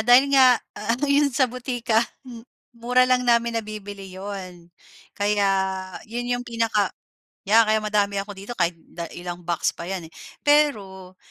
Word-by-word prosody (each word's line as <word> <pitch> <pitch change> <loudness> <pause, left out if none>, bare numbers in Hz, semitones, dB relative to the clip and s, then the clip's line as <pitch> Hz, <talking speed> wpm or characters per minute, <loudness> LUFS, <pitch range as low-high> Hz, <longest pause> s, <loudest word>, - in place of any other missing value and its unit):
dahil 250 +5 +5
nga 255 -3 +7 0.2
ano 230 +6 -2
'yon 285 0 +3
sa 265 0 +2
botika 245 -2 0 0.2
m 240 -3 -10 0.3
mura 245 +2 +2
lang 255 0 +2
namin 235 -1 +3
nabibili 205 -2 -8
'yun, 185 -3 -8 0.4
kaya 205 0 +1 0.6
'yun 245 +2 -4
'yung 245 0 -2
pinaka 225 -4 +1 0.6
yeah, 225 +3 +5
kaya 215 0 +2
madami 205 -2 0
ako 205 +1 -7
dito 200 +5 -7
kahit 170 -1 0 0.2
da 170 -1 -6
ilang 175 0 -7
box 170 -1 0
pa 170 - -7
'yan, 185 -4 -5
eh. - - -30 0.3
Pero, 200 -11 +1
220 Hz, 155 wpm, -23 LUFS, 195-245 Hz, 0.6 s, nga